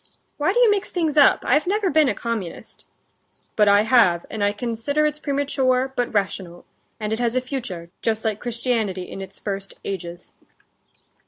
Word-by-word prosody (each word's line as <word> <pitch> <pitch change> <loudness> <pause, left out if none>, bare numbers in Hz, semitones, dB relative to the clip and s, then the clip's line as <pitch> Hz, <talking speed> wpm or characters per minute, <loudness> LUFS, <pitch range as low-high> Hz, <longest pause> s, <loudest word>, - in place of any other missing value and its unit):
"Why 300 +5 +2
do 405 - -2
you 485 -3 +6
mix 405 -1 0
things 320 -4 -1
up? 290 -2 +5
I've 295 +7 +2
never 405 0 +1
been 305 -2 +4
a - - -1
communist." 225 -7 -6 0.7
"But 210 -1 +4
I 205 +1 +6
have, 215 -8 +4
and 215 -2 -2
I 205 - +3
consider 240 +7 -1
it's 300 0 -1
premature, 270 -3 0
but 245 - -1
rational, 185 -4 -2 0.3
and 215 0 -2
it 220 - -2
has 240 0 0
a - - +4
future, 240 -11 -6
just 225 0 -1
like 215 -1 -1
Christianity 230 -6 -2
in 195 - -8
its 195 0 -8
first 195 -1 -5
ages." 175 -2 -6
230 Hz, 175 wpm, -22 LUFS, 200-280 Hz, 0.7 s, you